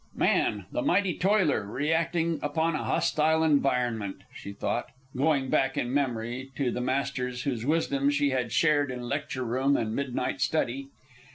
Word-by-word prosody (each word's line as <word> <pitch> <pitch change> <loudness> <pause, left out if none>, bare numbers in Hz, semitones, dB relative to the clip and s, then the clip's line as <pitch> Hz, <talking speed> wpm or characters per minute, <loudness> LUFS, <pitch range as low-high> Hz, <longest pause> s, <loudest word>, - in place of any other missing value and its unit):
Man, 105 -3 +1
the - - -1
mighty 185 +3 +2
toiler, 190 - +2
reacting 165 +7 0
upon 160 +3 0
a 150 - -2
hostile 160 +1 +2
environment, 125 -9 +1
she 100 - -8
thought, 120 +4 -2 0.3
going 140 -1 +1
back 135 0 +1
in 120 +1 -1
memory 125 -1 -2
to 130 -4 0
the 125 - -3
masters 130 -1 -2
whose 125 -3 -2
wisdom 140 -3 +1
she 145 -1 +2
had 125 -3 -1
shared 150 -3 +3
in 125 -1 -5
lecture 140 -1 -3
room 130 +4 +2
and 110 -1 -2
midnight 130 -2 -2
study. 135 -3 0
135 Hz, 155 wpm, -28 LUFS, 125-150 Hz, 0.3 s, shared